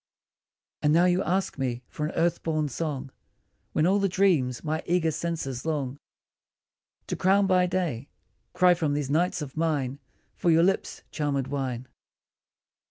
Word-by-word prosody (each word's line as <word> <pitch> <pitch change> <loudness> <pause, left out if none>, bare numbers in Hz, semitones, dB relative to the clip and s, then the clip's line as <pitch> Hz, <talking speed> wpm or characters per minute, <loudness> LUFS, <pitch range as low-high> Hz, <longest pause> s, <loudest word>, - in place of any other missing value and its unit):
And 150 - +3
now 170 +2 +5
you 180 +1 +3
ask 190 -5 -1
me 125 -2 -2
for 150 - -3
an - - -6
earth 170 0 +1
born 155 -2 -1
song, 140 -2 -4 0.6
When 155 - +2
all 195 +3 +3
the 195 0 +1
dreams 170 -11 +2
my 155 +1 -1
eager 170 -2 +2
senses 150 -6 -3
long 145 -4 -2 1.1
To - - -3
crown 195 +2 +3
by 185 -1 +3
day, 170 -8 -2 0.4
cry 180 -1 +5
from 155 -4 0
these 145 -2 -2
nights 170 +1 +1
of 135 -2 -9
mine 145 -5 -1 0.3
For 175 - 0
your 165 0 +5
lips' 190 +2 0
charmed 145 -4 -1
wine. 130 -3 -3
155 Hz, 155 wpm, -27 LUFS, 140-180 Hz, 1.1 s, now